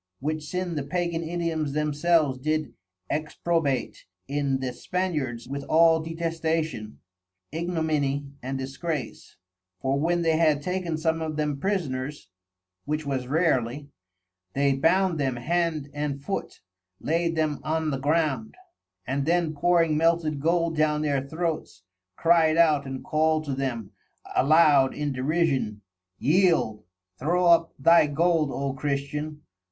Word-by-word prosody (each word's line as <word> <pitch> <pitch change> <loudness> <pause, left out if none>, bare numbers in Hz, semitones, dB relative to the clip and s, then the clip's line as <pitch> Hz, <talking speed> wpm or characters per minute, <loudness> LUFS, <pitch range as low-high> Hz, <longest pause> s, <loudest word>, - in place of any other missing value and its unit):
Which 155 +2 -3
sin 180 0 -3
the 150 - -2
Pagan_ 170 +2 -2
Indians 165 -3 -2
themselves 150 -2 +1
did 155 +2 -1 0.3
exprobate 150 -1 -1 0.2
in 140 -1 0
the 130 -2 -3
Spaniards 150 -9 -3
_with 140 +1 -5
all 165 0 +5
Detestation, 160 -7 -2 0.5
Ignominy 155 -4 -1 0.2
and 135 +2 -3
Disgrace: 140 +2 -5 0.4
for 135 +6 0
when 170 +3 +1
they 160 -1 +2
had 155 -3 +2
taken 180 -2 -2
some 160 0 0
of 155 -1 -3
them 150 -2 -1
Prisoners 145 - -3 0.6
(which 150 +1 -2
was 130 -3 -2
rarely) 145 -3 0 0.6
they 140 0 +2
bound 170 +4 +2
them 135 -3 0
hand 160 +2 -1
and 145 -1 -3
foot, 195 +8 -5 0.4
laid 165 +1 0
them 155 -2 0
on 155 0 -1
the 135 - -2
ground, 155 +7 0 0.5
and 135 +2 -2
then 170 -2 +2
pouring 165 0 +2
melted 165 -2 +1
Gold 165 +2 +1
down 155 0 +1
their 140 -3 +1
Throats, 160 - -4 0.3
cried 165 - +4
out 150 -4 +4
and 130 -1 -6
called 155 0 +1
to 140 - -2
them 125 -6 -3 0.4
aloud 145 -2 +5
in 145 -1 -2
derision,_ 135 -6 0 0.4
yield, 160 - +2 0.3
throw 175 +6 +1
up 170 -1 +4
thy 165 +3 +5
Gold 160 0 +2
O 135 0 -2
Christian! 150 +2 -3
155 Hz, 130 wpm, -26 LUFS, 140-165 Hz, 0.6 s, all